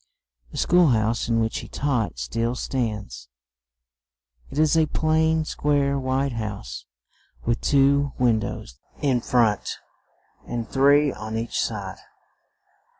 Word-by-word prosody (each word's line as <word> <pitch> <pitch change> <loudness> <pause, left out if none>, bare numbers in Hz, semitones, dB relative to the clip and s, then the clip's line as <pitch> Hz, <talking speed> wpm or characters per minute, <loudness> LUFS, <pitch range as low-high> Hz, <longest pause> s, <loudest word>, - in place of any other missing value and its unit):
The - - -10
school 180 -1 +4
house 115 -1 +1
in 115 -1 +2
which 110 0 -1
he - - -9
taught 125 - -1
still 115 - -2
stands; 105 - -4 1.2
it - - -8
is 155 +1 +3
a 160 -1 +3
plain, 160 +1 +1
square, 140 -2 0
white 135 +1 0
house, 105 - -6 0.6
with 115 0 0
two 140 0 +3
win 120 -3 +3
dows 60 - -7 0.2
in 130 -4 +2
front 115 -4 +1 0.7
and 120 -2 -4
three 140 +2 +4
on 110 +1 -5
each 115 +1 -2
side. 100 -4 -4
120 Hz, 125 wpm, -24 LUFS, 110-140 Hz, 1.2 s, school